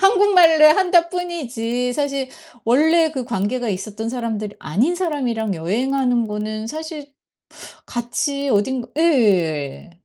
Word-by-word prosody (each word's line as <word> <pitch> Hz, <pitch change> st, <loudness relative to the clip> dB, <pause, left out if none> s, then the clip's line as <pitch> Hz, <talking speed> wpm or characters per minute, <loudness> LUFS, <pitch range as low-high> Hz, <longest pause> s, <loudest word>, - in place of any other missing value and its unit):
한국말로 380 Hz, -6 st, +5 dB
한다 355 Hz, -3 st, +3 dB
뿐이지 250 Hz, -9 st, -3 dB
사실 275 Hz, -1 st, -2 dB, 0.4 s
원래 315 Hz, +7 st, +3 dB
그 265 Hz, -5 st, -4 dB
관계가 235 Hz, +1 st, -2 dB
있었던 215 Hz, +3 st, -4 dB
사람들이 225 Hz, -4 st, -4 dB
아닌 225 Hz, -, 0 dB
사람이랑 255 Hz, -, -2 dB
여행하는 245 Hz, +7 st, 0 dB
거는 215 Hz, +1 st, -4 dB
사실 310 Hz, +1 st, -7 dB, 0.7 s
같이 280 Hz, +4 st, -3 dB
어딘가 245 Hz, +3 st, 0 dB
예. 185 Hz, -, +1 dB
250 Hz, 265 characters per minute, -20 LUFS, 220-315 Hz, 0.7 s, 한국말로